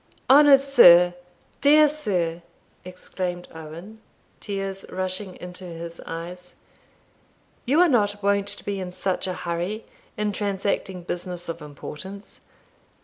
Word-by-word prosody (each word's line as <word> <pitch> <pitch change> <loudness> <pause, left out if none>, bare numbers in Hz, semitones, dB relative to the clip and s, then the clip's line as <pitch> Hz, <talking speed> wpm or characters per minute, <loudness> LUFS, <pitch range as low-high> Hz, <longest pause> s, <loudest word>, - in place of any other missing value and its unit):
"Honoured 280 -1 +7
sir! 180 -11 +7 0.5
dear 300 +2 +7
sir!" 185 - -1 0.4
exclaimed 180 -1 -5
Owen, 165 +7 -10 0.4
tears 195 -2 -4
rushing 185 +1 -3
into 180 +1 -9
his 170 -1 -8
eyes, 175 +2 -8 1.1
"you 285 +6 +3
are 360 - +6
not 205 -7 +1
wont 200 0 +1
to 205 0 -5
be 200 -1 -3
in 185 -1 -5
such 190 0 -2
a 185 - -2
hurry 175 +6 -4 0.3
in 210 0 0
transacting 195 -2 -2
business 175 0 -5
of 165 - -5
importance. 150 +7 -10
190 Hz, 120 wpm, -24 LUFS, 175-205 Hz, 1.1 s, Honoured